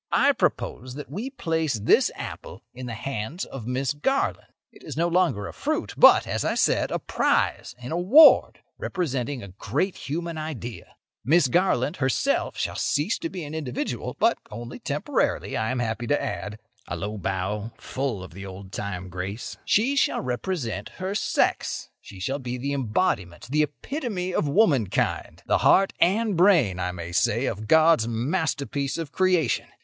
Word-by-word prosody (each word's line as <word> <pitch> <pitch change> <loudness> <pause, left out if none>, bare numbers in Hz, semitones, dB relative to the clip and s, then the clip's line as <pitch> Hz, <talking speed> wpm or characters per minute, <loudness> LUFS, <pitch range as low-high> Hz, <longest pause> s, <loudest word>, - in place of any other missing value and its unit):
I - - +5
propose 125 +1 -2
that 145 -2 -8
we 215 - -4
place 160 - -1
this 105 0 +4
apple - - -8
in 125 0 -7
the 115 - -4
hands 135 - -4
of 120 -4 -8
Miss 130 +2 -1
Garland. 265 - -1 0.2
It - - -18
is - - -7
no 170 +1 +2
longer 170 - +1
a - - -7
fruit, - - -2
but, - - +7
as - - -2
I - - 0
said, - - +2
a - - -1
prize, - - 0
in 125 +2 -8
award, 200 - +6 0.2
representing 140 - -2
a 100 - -9
great 110 - -2
human 165 +3 -4
idea. 125 -7 -7 0.3
Miss 150 +4 +4
Garland, 150 -2 +1
herself, 130 -2 0
shall - - -2
cease 150 - 0
to 165 - -3
be 180 -1 -6
an 150 0 -7
individual—but 150 -6 -1
only 120 +2 -8
temporarily, - - -1
I 110 0 0
am 130 - -1
happy 120 0 -2
to 145 - +2
add"—(a 100 +5 -6
low 105 +1 -4
bow, 95 +4 -2
full 130 -8 -3
of 90 - -11
the 95 +2 -8
old 95 0 -9
time 95 -3 -4
grace). 95 +5 -5
"She 245 +7 +2
shall 280 - +2
represent 125 - -3
her 190 +1 -3
sex; 210 - 0
she 95 - -12
shall 135 +9 -2
be 125 -1 -4
the 140 +3 -2
embodiment, 115 - -1
the 150 +1 +3
epitome 185 - -3
of 150 - +1
womankind—the 140 - +1
heart 195 0 +4
and 205 +3 +2
brain, 165 - +4
I 90 0 -1
may 85 -1 -7
say, 105 +8 +2
of 110 -3 -3
God's 160 -4 +5
masterpiece 140 +2 -1
of 165 -4 -5
creation. 180 -8 +1
135 Hz, 165 wpm, -25 LUFS, 110-170 Hz, 0.3 s, but